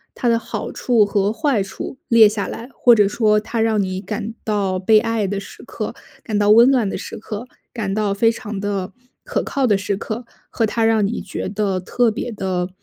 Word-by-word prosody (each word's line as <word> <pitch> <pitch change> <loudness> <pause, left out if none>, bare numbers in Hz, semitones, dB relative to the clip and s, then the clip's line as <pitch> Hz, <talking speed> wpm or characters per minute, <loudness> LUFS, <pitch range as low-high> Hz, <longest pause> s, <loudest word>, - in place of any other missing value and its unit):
它 245 - -2
的 230 -1 +3
好 - - -5
处 230 -4 +2
和 200 0 +1
坏 265 -4 +1
处 255 +7 -6
列 230 -2 +7
下 205 -2 -2
来。 235 +3 -7
或 240 -2 +5
者 205 -2 +4
说 210 0 +2
它 225 +1 -3
让 220 -2 +2
你 185 0 -3
感 215 +1 -5
到 200 -3 0
被 215 +4 +4
爱 225 -2 -1
的 200 +1 -2
时 200 - -11
刻、 - - -5 0.3
感 215 -3 -1
到 205 0 +3
温 235 +5 +7
暖 240 -7 +2
的 - - -3
时 - - -7
刻、 215 +2 -7 0.2
感 210 -5 -3
到 210 -2 0
非 225 +3 +4
常 215 -3 -6
地 200 -2 -3 0.3
可 - - -2
靠 270 -2 0
的 205 -4 +3
时 195 +1 -2
刻， 220 +4 -5 0.2
和 230 - 0
它 225 +1 -1
让 225 -2 +3
你 230 - -2
觉 - - -5
得 200 -2 -1
特 240 +5 +1
别 230 +2 -4
的 185 -3 -2
215 Hz, 230 characters per minute, -20 LUFS, 200-230 Hz, 0.3 s, 列